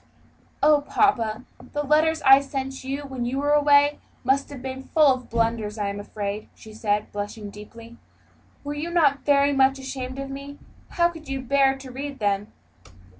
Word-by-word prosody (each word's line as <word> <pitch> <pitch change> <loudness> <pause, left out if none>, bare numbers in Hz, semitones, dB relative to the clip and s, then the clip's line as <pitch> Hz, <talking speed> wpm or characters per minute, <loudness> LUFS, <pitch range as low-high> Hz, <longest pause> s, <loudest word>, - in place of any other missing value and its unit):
"Oh, 300 -1 +5
papa, 250 - +1 0.3
the 295 - -1
letters 315 +2 +2
I 270 0 +8
sent 270 -1 -5
you 275 +2 -3
when 265 -3 -5
you 245 +3 -2
were 290 +1 0
away 290 0 +4 0.2
must 265 +2 +1
have 285 -2 -8
been 260 +1 -6
full 295 0 +4
of 255 -1 -8
blunders, 225 -2 -1
I 205 -1 -1
am 200 0 -5
afraid," 205 0 -5
she 220 - -13
said, 210 -1 -1
blushing 205 0 -6
deeply; 230 +3 -12 0.7
"were 290 0 -4
you 300 +3 -4
not 300 -5 +3
very 285 0 +3
much 270 0 +3
ashamed 260 -1 -6
of 275 0 -5
me? 280 +1 -8 0.3
How 345 0 +2
could 320 -4 -11
you 270 0 -2
bear 270 +1 +2
to 265 -1 -10
read 275 +2 -6
them?" 205 -2 -1
270 Hz, 175 wpm, -24 LUFS, 230-285 Hz, 0.7 s, I